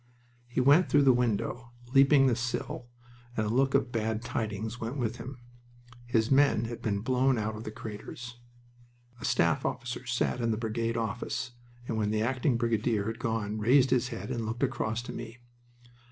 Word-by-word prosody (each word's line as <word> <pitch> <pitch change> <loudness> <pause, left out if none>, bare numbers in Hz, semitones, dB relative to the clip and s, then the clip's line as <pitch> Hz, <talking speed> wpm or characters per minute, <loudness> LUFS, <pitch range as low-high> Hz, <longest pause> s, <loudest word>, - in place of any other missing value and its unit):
He 125 - -2
went 145 +7 +5
through 145 -1 +5
the 135 -2 +6
window, 120 0 -1 0.2
leaping 135 0 +6
the 125 -3 +3
sill, 120 0 -3 0.5
and 110 - +1
a 105 - -1
look 135 +2 +2
of 125 - +2
bad 110 -1 -1
tidings 110 0 -3
went 115 +5 -3
with 120 -2 -2
him. 130 +1 -7 0.7
His 115 -1 +1
men 135 -4 +4
had 115 0 -6
been 100 -2 -1
blown 130 +2 +2
out 110 0 -2
of 110 - -8
the 110 - -4
craters. 120 +3 -8 0.8
A - - -5
staff 85 -2 +2
officer 120 +1 -4
sat 125 0 0
in 115 - +1
the 110 - 0
brigade 115 +1 -1
office, 115 +2 -3 0.4
and 110 - -2
when 105 -1 +1
the 110 0 +1
acting 125 +1 +1
brigadier 115 -2 +1
had 115 +1 -4
gone 110 -3 -2
raised 125 +4 +4
his 125 -1 +3
head 120 0 -6
and 120 -2 -2
looked 115 +4 -3
across 120 -3 -1
to - - -7
me. 115 0 -7
120 Hz, 180 wpm, -29 LUFS, 110-125 Hz, 0.8 s, the